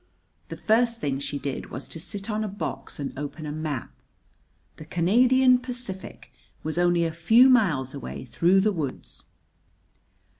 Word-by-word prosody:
The -, -, -6 dB
first 230 Hz, +1 st, +2 dB
thing 135 Hz, -6 st, -2 dB
she 140 Hz, +1 st, -4 dB
did 140 Hz, -1 st, -4 dB
was 130 Hz, -, -7 dB
to 165 Hz, -, -8 dB
sit 195 Hz, +4 st, -7 dB
on 215 Hz, -1 st, -1 dB
a -, -, -2 dB
box 205 Hz, -5 st, -6 dB
and 140 Hz, -, -4 dB
open 145 Hz, +3 st, -6 dB
a 150 Hz, -, -4 dB
map. 155 Hz, -2 st, -4 dB, 0.9 s
The 155 Hz, -, -10 dB
Canadian 250 Hz, +10 st, +4 dB
Pacific 245 Hz, -, -7 dB, 0.3 s
was 160 Hz, +2 st, -2 dB
only 175 Hz, -1 st, +3 dB
a 165 Hz, -, -2 dB
few 225 Hz, +10 st, +6 dB
miles 165 Hz, -, +3 dB
away 140 Hz, -2 st, -7 dB
through 175 Hz, +10 st, +3 dB
the 215 Hz, +2 st, +2 dB
woods! 150 Hz, -7 st, -5 dB
175 Hz, 155 wpm, -26 LUFS, 150-225 Hz, 0.9 s, few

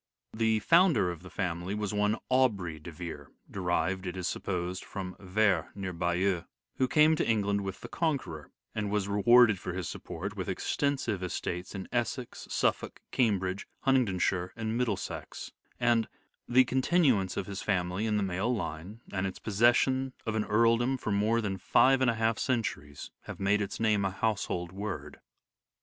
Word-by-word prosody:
FamUy -, -, -10 dB
The 110 Hz, -1 st, +3 dB
founder 165 Hz, -, +4 dB
of 85 Hz, -2 st, -8 dB
the 90 Hz, -, -11 dB
family 90 Hz, +2 st, -3 dB
was 105 Hz, -1 st, -2 dB
one 105 Hz, +1 st, +1 dB
Aubrey 105 Hz, -11 st, +1 dB
de 85 Hz, +3 st, -9 dB
Vere 80 Hz, -4 st, -7 dB, 0.2 s
(derived, 95 Hz, 0 st, -1 dB
it 90 Hz, -, -4 dB
is 90 Hz, -1 st, -2 dB
supposed, 90 Hz, 0 st, -3 dB
from 95 Hz, -2 st, -6 dB
Ver 95 Hz, -3 st, +1 dB
near 95 Hz, -2 st, -4 dB
Bayeux) 85 Hz, +1 st, 0 dB, 0.3 s
who 130 Hz, -, +2 dB
came 155 Hz, +4 st, +5 dB
to -, -, 0 dB
England 100 Hz, -2 st, +1 dB
with 95 Hz, -1 st, -5 dB
the -, -, -7 dB
Conqueror, 140 Hz, -, -2 dB, 0.2 s
and 105 Hz, -2 st, -2 dB
was 105 Hz, -1 st, 0 dB
re 100 Hz, 0 st, -1 dB
warded 120 Hz, -4 st, +7 dB
for 90 Hz, -, -5 dB
his 90 Hz, -1 st, -3 dB
support, 95 Hz, +5 st, -6 dB
with 95 Hz, -3 st, -4 dB
extensive 120 Hz, +1 st, -1 dB
estates 90 Hz, +1 st, -4 dB
in 95 Hz, -1 st, -5 dB
Essex, 120 Hz, 0 st, -3 dB
Suffolk, -, -, 0 dB
Cambridge, 100 Hz, -6 st, 0 dB
Huntingdonshire 95 Hz, -8 st, +1 dB
and 110 Hz, -1 st, -3 dB
Middlesex; 115 Hz, -6 st, -3 dB, 0.3 s
and 115 Hz, -2 st, +3 dB, 0.2 s
" -, -, -49 dB
the 130 Hz, -, +10 dB
continuance 130 Hz, -, +2 dB
of 95 Hz, -, -1 dB
his 100 Hz, 0 st, -5 dB
family 95 Hz, +1 st, 0 dB
in 105 Hz, -1 st, +1 dB
the 105 Hz, -, +1 dB
male 95 Hz, +5 st, -1 dB
line, 100 Hz, 0 st, -4 dB
and 95 Hz, -1 st, 0 dB
its 95 Hz, -, -6 dB
possession 120 Hz, +5 st, +2 dB
of 110 Hz, -, -1 dB
an 110 Hz, -1 st, 0 dB
earldom 115 Hz, +4 st, +3 dB
for 110 Hz, -, -3 dB
more 110 Hz, +3 st, +2 dB
than 100 Hz, -3 st, -3 dB
five 135 Hz, +8 st, +4 dB
and 130 Hz, -, +4 dB
a 115 Hz, -, +1 dB
half 110 Hz, 0 st, +1 dB
centuries 100 Hz, -, -2 dB
have -, -, -8 dB
made 100 Hz, +1 st, +2 dB
its 100 Hz, -, -4 dB
name 105 Hz, -3 st, +2 dB
a 95 Hz, -, +1 dB
household 95 Hz, -4 st, -2 dB
word." 100 Hz, +3 st, -6 dB
100 Hz, 175 wpm, -30 LUFS, 90-115 Hz, 0.3 s, the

